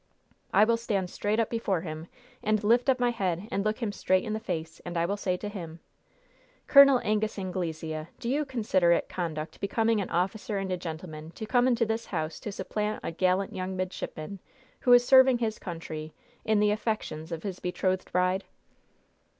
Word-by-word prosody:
I 200 - +6
will 230 +1 +3
stand 200 -6 -2
straight 210 +2 -1
up 225 - +1
before 205 -7 0
him 160 -1 -6 0.3
and 215 0 +1
lift 240 +5 +3
up 260 -1 +3
my 245 -1 +2
head 190 -3 -2
and 195 - 0
look 215 +3 -1
him 215 - 0
straight 185 -2 +1
in 215 -3 -3
the 220 - -2
face, 165 -6 -5
and 175 -1 -5
I 170 - +2
will 200 +4 -1
say 185 -3 -1
to 210 - -5
him: 170 -5 -7 0.9
"'Col. 275 -2 +8
Angus 215 0 0
Anglesea, 160 -4 -3
do - - -5
you 285 +5 +1
consider 215 -10 +2
it - - 0
conduct 160 -3 -4
becoming 220 +2 +1
an 190 - -4
officer 200 +6 -1
and 195 -1 -3
a - - +1
gentleman 160 -2 -7
to 220 - -5
come 245 +2 +3
into 240 -2 +3
this 225 +1 -2
house 155 0 -3
to 210 - -5
supplant 210 +2 -3
a - - -3
gallant 185 +3 +1
young 185 +1 -3
midshipman, 185 0 -5 0.4
who 250 - +2
is 245 0 +8
serving 260 -1 +7
his 225 -2 -2
country, 160 -3 -6 0.3
in 215 -1 +3
the 210 0 +4
affections 210 -7 -3
of 165 -1 -4
his 190 -3 -4
betrothed 185 +1 -1
bride?'" 180 +2 +1
195 Hz, 190 wpm, -28 LUFS, 175-220 Hz, 0.9 s, Col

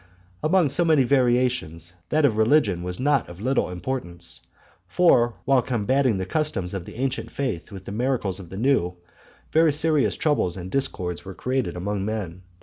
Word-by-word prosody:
Among 155 -2 +3
so 175 +5 +2
many 155 -5 +4
variations, 120 - +1 0.2
that 155 -1 +3
of 120 -6 +2
religion 110 - +3
was 90 0 -5
not 140 -3 +1
of 85 +1 -11
little 130 +1 0
importance; 90 -3 -5 0.5
for, 120 -10 +3
while 135 -2 +4
combating 125 0 +1
the 95 - -2
customs 95 - -2
of 95 -3 -4
the - - -10
ancient 130 +2 -2
faith 115 -10 -4
with 95 -2 -9
the - - -6
miracles 110 -4 -1
of 90 -4 -10
the 95 - -8
new, 110 -7 +1 0.6
very 160 0 +4
serious 150 -1 +2
troubles 145 - +1
and 90 0 -7
discords 90 -11 -1
were 95 0 -9
created 125 -9 -2
among 100 +2 -2
men. 100 -4 -4
120 Hz, 170 wpm, -24 LUFS, 95-135 Hz, 0.6 s, many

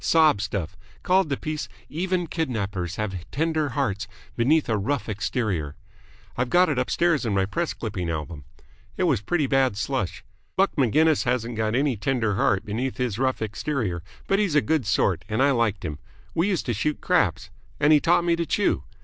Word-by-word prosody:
Sob 155 -10 +4
stuff. 100 -5 -3 0.3
Called 185 -2 +3
the 140 - 0
piece 155 -1 -4 0.2
'Even 180 +2 -1
Kidnappers 100 - -2
Have 95 -5 -4
Tender 160 0 0
Hearts 110 -7 -1 0.3
Beneath 145 +6 +3
A 115 - +1
Rough 125 +7 -1
Exterior.' 105 - -2 0.6
I've 125 0 -1
got 180 +3 +4
it 140 -4 0
upstairs 160 +4 +1
in 110 -4 0
my 95 -1 +2
press 165 - -2
clipping 95 -7 -4
album. 75 -2 -5 0.5
It - - +1
was 140 - +2
pretty 155 - 0
bad 130 -5 +2
slush. 115 -5 -2 0.3
Buck 195 +1 +2
Maginnis 150 +4 +3
hasn't 120 -1 -1
got 110 0 0
any 135 -2 +1
tender 110 -1 0
heart 95 -1 +1
beneath 120 +5 -3
his 120 -4 -2
rough 130 -3 0
exterior, 110 - -2 0.2
but 195 - +2
he's 200 -8 +1
a 150 - +6
good 155 -8 0
sort 100 - +1
and 110 - -1
I 140 - +4
liked 115 -6 0
him. 75 -1 -4 0.3
We 170 +4 +1
used 190 -5 0
to 120 - 0
shoot 150 +8 -1
craps. - - +1 0.3
And 150 +1 +5
he 150 - +7
taught 170 +3 +3
me 170 -1 +3
to 170 - -1
chew. 205 - +1
125 Hz, 185 wpm, -25 LUFS, 105-155 Hz, 0.6 s, he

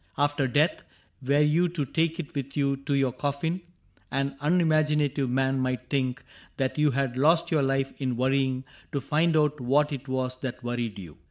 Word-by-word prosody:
After 145 -1 +1
death. 145 +6 +2 0.4
Were 140 +3 +2
you 155 +4 +3
to 165 -4 -2
take 165 +5 0
it 170 0 -6
with 140 -1 -5
you 140 -1 +2
to 140 +1 -2
your 135 -2 +2
coffin 145 +7 -2 0.5
An 135 0 -1
unimaginative 150 -4 +2
man 135 +1 +1
might 130 -2 -2
think 130 -2 -1 0.3
That 135 +2 -1
you 150 0 +4
had 135 -2 -1
lost 165 +6 +3
your 155 -3 +3
life 135 0 0
in 130 -3 -1
worrying 130 0 +1 0.3
To 140 - 0
find 160 +3 +2
out 150 -1 +2
what 145 +4 +2
it 135 0 -6
was 130 -1 -2
that 130 -1 -5
worried 120 -3 -3
you. 85 -6 -10
140 Hz, 180 wpm, -27 LUFS, 130-150 Hz, 0.5 s, you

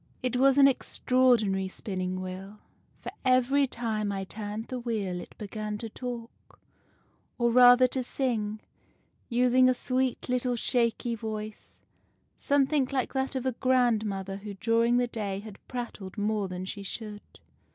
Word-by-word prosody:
It 250 -1 -1
was 270 +2 +4
an 275 -1 +8
extraordinary 245 -7 +2
Spinning 185 -1 -4
Wheel; 190 +3 -7 0.4
for - - -6
every 255 +2 +3
time 220 -4 -2
I 195 -1 -3
turned 210 +2 -5
the 255 - -3
wheel 210 -7 -2
it - - -13
began 210 0 -5
to 225 +1 -6
talk, 240 0 -8 0.8
or 235 -1 +2
rather 245 +1 +8
to 260 - -1
sing, 220 -5 -2 0.7
using 250 +1 +4
a 255 - +2
sweet 255 0 -1
little 250 -1 0
shaky 235 0 0
voice, 215 -1 -6 0.6
something 280 -1 +2
like 265 -2 -1
that 265 0 -1
of 260 -1 -2
a 260 - +2
grandmother 220 -7 +1
who 200 0 -8
during 230 +4 +2
the 245 - +3
day 205 -5 -4
has 215 -1 -9
prattled 235 -6 -6
more 210 -1 0
than 185 0 -5
she 200 +2 -6
should. 210 +1 -6
230 Hz, 145 wpm, -28 LUFS, 205-255 Hz, 0.8 s, an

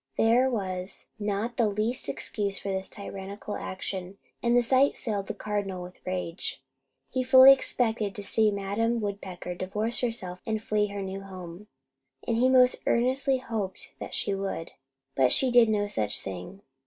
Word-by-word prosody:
There 240 +4 +4
was 185 -5 -3
not 210 +3 -2
the 230 -3 +3
least 215 +4 -1
excuse 200 -2 -2
for 200 - -5
this 190 0 -2
tyrannical 200 +1 -7
action; 185 0 -5 0.2
and 240 0 +3
the 245 - +4
sight 260 +4 +3
filled 205 -4 -3
the - - -4
Cardinal 200 -3 -3
with 180 +1 -12
rage. 180 -1 -3 0.5
He 260 - 0
fully 260 +1 +9
expected 225 -6 0
to 205 - -6
see 220 +2 +4
Madam 205 +4 0
Woodpecker 195 -4 -5
divorce 210 +6 0
herself 195 -7 -2
and 220 -1 0
flee 210 -1 0
her 200 -1 -5
new 190 +1 -5
home, 185 0 -9 0.6
and 230 - +1
he 255 +2 +4
most 255 -1 +5
earnestly 260 +3 +2
hoped 215 -7 -4
that - - -5
she 200 - 0
would; 195 -4 -4 0.4
but 130 -2 +3
she 260 -2 +3
did 240 -2 +6
no 210 -1 +1
such 110 - -1
thing. 95 - -8
205 Hz, 165 wpm, -28 LUFS, 190-235 Hz, 0.6 s, fully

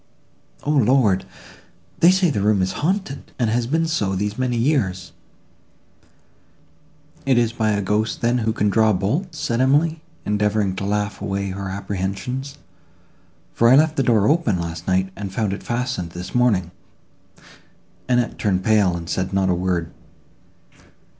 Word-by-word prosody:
"O 145 - 0
Lord! 125 -8 +3 0.7
they 170 - +7
say 185 -3 +3
the 105 - -1
room 105 -2 +2
is 95 - -1
haunted, 180 -3 -2
and 115 -4 0
has 120 +1 0
been 160 +5 +1
so 105 -12 -1
these 105 +2 -2
many 125 -1 -1
years." 105 - 0 2.1
"It 135 -3 +2
is 115 -1 +2
by 110 -2 0
a 100 0 -1
ghost, 105 +3 -1
then, 120 +1 +2
who 110 -1 0
can 105 -2 0
draw 110 0 +3
bolts," 150 - -2
said 130 -5 -1
Emily, 155 +4 +2 0.2
endeavouring 105 -2 0
to 100 - -3
laugh 105 0 -2
away 100 -1 -2
her 95 0 -5
apprehensions; 100 +8 -4 1.0
"for 115 - +4
I 130 - +7
left 155 +2 +4
the 140 - +1
door 110 -6 +3
open, 145 - +2
last 85 0 -5
night, 95 0 +1
and 100 -2 -6
found 100 0 -1
it 100 - -6
fastened 120 -8 -3
this 90 +1 -7
morning." 105 -8 +2 1.4
Annette 125 -1 +1
turned 95 -3 0
pale, 105 -5 +3
and 85 -1 -8
said 95 +2 -2
not 95 -1 +2
a - - +3
word. 90 -2 -1
105 Hz, 155 wpm, -21 LUFS, 95-130 Hz, 2.1 s, they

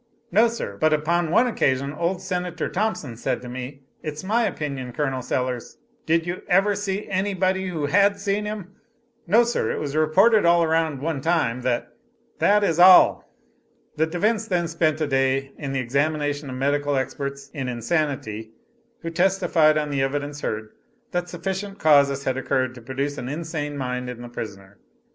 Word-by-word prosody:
"No, 220 +6 +5
Sir. 225 - -5
But 155 +5 +3
upon 165 +2 +1
one 230 +9 +4
occasion, 140 - 0
old 175 +4 -2
Senator 180 -3 -3
Thompson 190 - -2
said 115 - -2
to - - -7
me, 130 +2 -7 0.2
its 155 +1 -6
my 225 +4 +1
opinion, 135 - -4
Colonel 135 -2 -1
Sellers" 125 -1 -3 0.3
"Did 165 +1 +2
you 175 +1 -4
ever 195 +3 +3
see 200 0 -3
any 195 +1 -1
body 190 +1 0
who 165 -5 -2
had 200 +6 +3
seen 200 +1 -1
him?" 210 -3 -6 0.6
"No, 220 +7 +5
sir: 240 0 -1
It - - -2
was 145 -1 -4
reported 195 +8 +4
around 165 -2 +3
at 135 - -7
one 155 -4 -2
time, 135 -7 +1
that" 125 -1 -2 0.5
"That 205 0 +4
is 165 -4 +1
all." 185 +1 +7 0.6
The 160 +1 +1
defense 210 +6 0
then 175 -4 0
spent 160 -2 0
a - - +2
day 135 0 +1
in 140 -2 -4
the 135 - -1
examination 145 +3 -1
of 130 - -5
medical 145 +2 0
experts 140 +1 -4
in 135 -4 -4
insanity 120 -4 -2 0.5
who 165 - -3
testified, 165 -3 +3
on 150 -1 -1
the 140 -1 0
evidence 145 +2 -2
heard, 110 0 -4 0.4
that 175 -1 -2
sufficient 190 +3 -4
causes 140 -4 +4
had 130 -1 -1
occurred 130 -1 0
to 125 - -12
produce 135 +4 -3
an 125 - -5
insane 150 -1 -4
mind 125 -1 -3
in 120 -1 -7
the 120 - -8
prisoner. 100 -4 -8
155 Hz, 175 wpm, -23 LUFS, 135-180 Hz, 0.6 s, all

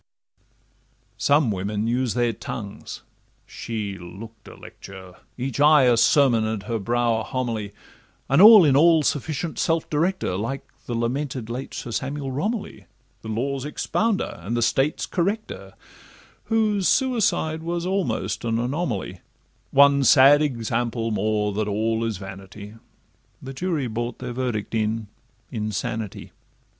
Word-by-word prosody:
Some 145 -4 +3
women 105 +2 -2
use 120 0 0
their 120 -1 +1
tongues—she 105 -1 -8
look'd 105 +6 -11
a - - -11
lecture, 95 -1 -12 0.2
Each 130 +2 -4
eye 150 -1 +6
a 125 -2 +5
sermon, 115 0 +4
and 110 -2 -3
her 115 +1 -3
brow 120 +2 0
a - - -4
homily, 115 -5 -3 0.6
An 140 +6 +4
all 210 -3 +10
in 140 -3 +4
all 160 +1 +5
sufficient 155 +3 -2
self 165 -1 0
director, 160 - 0
Like 115 +8 -4 0.2
the 120 - -3
lamented 125 0 -3
late 130 +3 -6
Sir 120 - -6
Samuel 135 +3 -3
Romilly, 205 - -4 0.3
The - - -10
Law's 130 +5 -2
expounder, 195 - -1
and 110 +7 -3
the 120 - +1
State's 135 +6 +1
corrector, 200 +5 -3 0.7
Whose 215 -4 +1
suicide 220 - +1
was 170 +1 -3
almost 190 -7 -2
an 115 -1 0
anomaly— 120 - -3 0.5
One 140 0 +5
sad 140 +3 +7
example 115 -4 -1
more, 105 0 0
that 105 +1 -1
'All 110 +2 0
is 115 -3 -2
vanity' 95 +2 -10 0.7
(The 135 +1 -8
jury 155 -1 -2
brought 120 +1 -4
their 125 -1 -6
verdict 120 -5 -3
in 110 -1 -1 0.4
'Insanity'). 110 0 -4
120 Hz, 130 wpm, -23 LUFS, 110-145 Hz, 0.7 s, all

